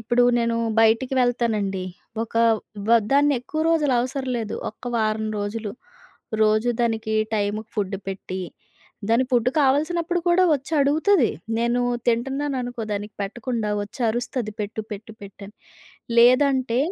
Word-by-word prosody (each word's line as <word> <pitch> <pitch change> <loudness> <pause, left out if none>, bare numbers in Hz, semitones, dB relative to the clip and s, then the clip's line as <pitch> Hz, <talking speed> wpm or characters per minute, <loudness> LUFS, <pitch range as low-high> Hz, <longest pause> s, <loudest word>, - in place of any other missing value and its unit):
ఇప్పుడు 240 +2 +2
నేను 230 0 0 0.2
బయటికి 225 +4 +3
వెళ్తానండి. 215 -6 0 0.4
ఒక 230 - -9 0.5
వ - - +2 0.2
దాన్ని 285 +1 +4
ఎక్కువ 310 +5 -4
రోజులు 300 -5 +2
అవసరం 260 +1 -3
లేదు 220 -2 -4 0.2
ఒక్క 215 - -18
వారం 220 0 0
రోజులు. 205 +1 -4 0.7
రోజు 215 +2 +3
దానికి 225 -2 0 0.2
టైముకి 210 +1 -2
ఫుడ్డు 200 -1 -1
పెట్టి, 190 -1 -5 0.7
దాని 230 +3 +3
ఫుడ్డు 245 -1 +3
కావాల్సినప్పుడు 325 +6 +1
కూడా 360 +2 +4
వచ్చి 275 +2 -6
అడుగుతది. 300 - +3 0.3
నేను 235 +1 +1 0.3
తింటున్నాననుకో 250 0 -1
దానికి 205 +1 -5
పెట్టకుండా 225 +2 -3
వచ్చరుస్తది, 235 +1 -2
పెట్టు, 210 +1 -3
పెట్టు, 215 +2 -8
పెట్టు 200 0 -11
అని. 210 - -14 0.6
లేదంటే 255 0 +4
235 Hz, 125 wpm, -23 LUFS, 215-265 Hz, 0.7 s, దాన్ని